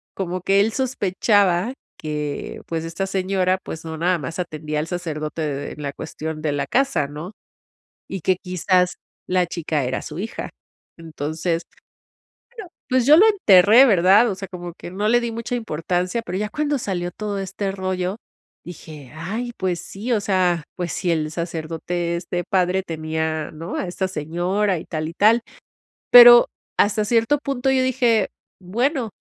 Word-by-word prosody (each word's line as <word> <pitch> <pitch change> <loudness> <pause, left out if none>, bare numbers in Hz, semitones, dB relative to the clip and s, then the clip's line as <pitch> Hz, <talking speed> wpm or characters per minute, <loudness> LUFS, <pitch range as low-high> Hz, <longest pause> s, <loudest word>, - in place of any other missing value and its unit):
como 185 -1 -3
que 195 +2 +3
él 220 - +1
sospechaba 205 -4 +1 0.2
que 150 -2 -5
pues 165 -1 -3
esta 170 +4 -3
señora 190 -1 0
pues 160 - -7
no 160 0 -5
nada 175 +2 +1
más 160 +5 -6
atendía 155 -3 -3
al 155 - -3
sacerdote 160 -3 -4
de 145 -1 -4
la 145 -2 -4
cuestión 155 0 -6
de 150 - -1
la 145 - -2
casa, 270 - +1
¿no?, 150 +7 -8 0.8
y 195 - -5
que 185 0 +2
quizás 180 0 +1 0.3
la 180 -1 +2
chica 160 -4 -2
era 130 +1 -2
su 150 - -8
hija, 215 +4 -5 0.5
entonces, 165 +1 -3
bueno, - - -27 1.1
pues, 255 -2 +2
yo 305 +2 +8
lo 415 - +7
enterré, 225 - +6
¿verdad?, 200 +2 +5
o - - -4
sea, 195 0 -7
como 175 -2 -7
que 175 - -9
no 205 +3 -1
le 240 +1 +4
di 235 -1 -3
mucha 230 +2 -4
importancia, 180 0 -2
pero 185 - -3
ya 210 +1 -1
cuando 295 +1 -1
salió 175 -4 -3
todo 205 +1 -4
este 195 +1 -3
rollo 185 0 -2 0.5
dije: 155 -5 -11
"Ay, 215 +10 -4
pues 180 -2 -1
sí, 220 +6 -6
o 215 - +1
sea, 180 -4 +1
pues 175 -2 -3
si 175 - -1
el 155 -2 -1
sacerdote, 170 +1 -3
este, 175 0 -3
padre 185 0 +1
tenía, 160 -1 -3
¿no?, 165 +2 -7
a 185 - -2
esta 190 +2 -2
señora, 180 +4 -1
y - - -10
tal 155 -2 -4
y - - -9
tal", 220 +6 +4 0.7
pero 240 -1 +10 0.3
hasta 210 +1 +3
cierto 230 +6 +2
punto 270 -2 -1
yo 265 -1 +3
dije: 245 -5 +2 0.3
"Bueno, 240 - -1
185 Hz, 165 wpm, -22 LUFS, 165-210 Hz, 1.1 s, pero